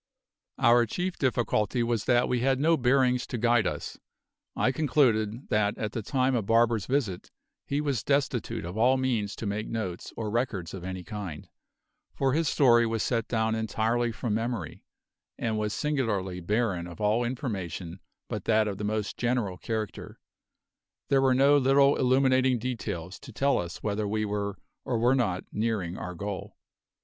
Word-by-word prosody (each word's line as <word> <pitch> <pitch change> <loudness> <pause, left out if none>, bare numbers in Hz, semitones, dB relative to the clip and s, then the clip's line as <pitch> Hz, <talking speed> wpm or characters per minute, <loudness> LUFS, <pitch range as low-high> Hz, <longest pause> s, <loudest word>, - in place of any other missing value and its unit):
Our 120 0 +5
chief 180 - -3
difficulty 120 -2 +1
was 115 -2 -1
that 120 -1 +3
we 125 - 0
had 130 +1 +2
no 165 +3 +4
bearings 125 -2 +2
to 120 - -4
guide 120 -2 +3
us. - - -5 0.6
I 130 - +2
concluded 125 -5 +1
that 105 -1 +1
at 105 -1 -3
the 115 - -3
time 130 +3 +1
of 110 -5 -1
Barber's 115 -2 +3
visit 125 -10 -1 0.4
he 140 +1 0
was 140 -7 -1
destitute 140 -9 -1
of 90 +2 -6
all 130 +3 +4
means 120 -6 -1
to - - -6
make 105 +1 -2
notes 100 -6 -4
or 110 -2 -3
records 110 -8 -2
of 95 -3 -7
any 95 0 -5
kind, 100 -7 -7 0.7
for 135 -1 +1
his 160 0 +1
story 120 -4 +5
was 115 -1 -1
set 115 -2 -1
down 110 -1 0
entirely 110 +2 0
from 115 -1 -3
memory, 115 -7 -3 0.5
and 110 -2 -1
was 105 0 -1
singularly 105 -11 -1
barren 95 -2 -1
of 85 +2 -11
all 105 +3 +2
information 95 - -4 0.3
but - - -5
that 110 -1 +3
of 100 -2 -4
the - - -4
most 105 0 -2
general 120 -7 -1
character; 110 -2 -5 0.9
there 135 -1 +4
were 130 -1 +4
no 140 +2 +5
little 140 +1 +4
illuminating 130 0 +3
details 105 -7 -4
to 130 - -11
tell 140 +5 +1
us 85 -1 -6
whether 105 0 -1
we 110 +1 -1
were 100 -1 -3 0.3
or 120 - -1
were 120 +3 +3
not 110 -9 0
nearing 105 -6 -1
our 90 -1 -6
goal. 100 +2 -6
115 Hz, 170 wpm, -28 LUFS, 105-130 Hz, 0.9 s, Our